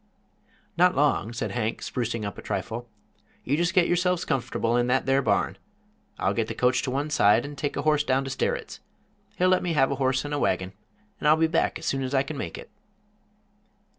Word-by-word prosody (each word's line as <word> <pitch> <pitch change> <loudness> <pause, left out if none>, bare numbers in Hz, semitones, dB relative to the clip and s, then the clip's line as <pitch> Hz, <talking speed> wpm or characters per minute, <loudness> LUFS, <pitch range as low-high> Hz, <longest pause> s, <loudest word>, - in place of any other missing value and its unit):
"Not 180 +1 +4
long," 145 -5 +1
said 120 - -3
Hank, 115 -2 -2
sprucing 115 -3 -3
up 100 - -5
a - - -7
trifle. 120 +1 -4 0.5
"You 140 - 0
just 170 +2 0
get 180 -2 +5
yourselves 180 0 +1
comfortable 120 -3 -1
in 120 0 +2
that 130 +2 +1
there 135 +1 +3
barn. - - 0 0.6
I'll - - 0
get - - -1
the - - -5
coach 125 +1 +2
to - - -3
one 140 +4 -2
side, 115 -3 +4
and 145 0 -7
take 145 0 -3
a - - -2
horse 150 -1 +3
down 135 -1 +1
to 135 - -4
Sterritt's. 475 - -2 0.6
He'll 185 -2 +2
let 185 - +3
me 175 -2 -1
have 135 -3 +3
a - - 0
horse 130 +1 +1
and 145 - -4
a 145 - 0
wagon, 95 -4 0 0.5
and - - 0
I'll 155 +1 +6
be 160 - +3
back 160 - 0
as 160 - -9
soon 135 - 0
as 130 +1 -2
I 135 - +3
kin 150 +2 -6
make 140 - -5
it." - - -11
135 Hz, 220 wpm, -26 LUFS, 125-155 Hz, 0.6 s, I'll